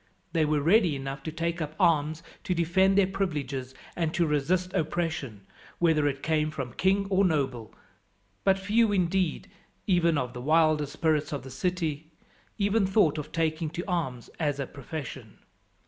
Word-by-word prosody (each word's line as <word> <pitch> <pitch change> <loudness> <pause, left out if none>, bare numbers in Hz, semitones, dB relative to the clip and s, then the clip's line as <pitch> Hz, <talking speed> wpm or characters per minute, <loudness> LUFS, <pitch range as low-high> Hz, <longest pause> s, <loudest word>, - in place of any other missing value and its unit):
They 160 -2 +3
were 150 -1 +1
ready 175 0 +4
enough 135 +1 -5
to 160 - -5
take 170 +1 -2
up 155 0 -4
arms 160 -2 +2 0.2
to 180 - 0
defend 190 +3 +3
their 200 - +6
privileges 145 -9 -3 0.2
and 165 -2 0
to 170 - +3
resist 170 +5 0
oppression, 155 - -2 0.3
whether 160 -4 +3
it 135 -1 -3
came 155 -1 +1
from 135 -6 -5
king 195 +2 +2
or 190 +1 +4
noble; 135 - -1 0.7
but 195 0 +4
few 210 +3 +2
indeed, 185 -3 0 0.4
even 170 -4 +3
of 125 -2 -2
the 125 - -6
wilder 155 +1 +3
spirits 155 +1 0
of 145 -3 -4
the 130 - -9
city, 160 0 -2 0.5
ever 205 +2 +2
thought 190 -6 +3
of 150 +1 -7
taking 160 -1 -1
to 170 +3 -5
arms 130 -10 -3
as 145 -3 0
a 140 - -1
profession. 135 -5 -8
160 Hz, 165 wpm, -28 LUFS, 145-180 Hz, 0.7 s, their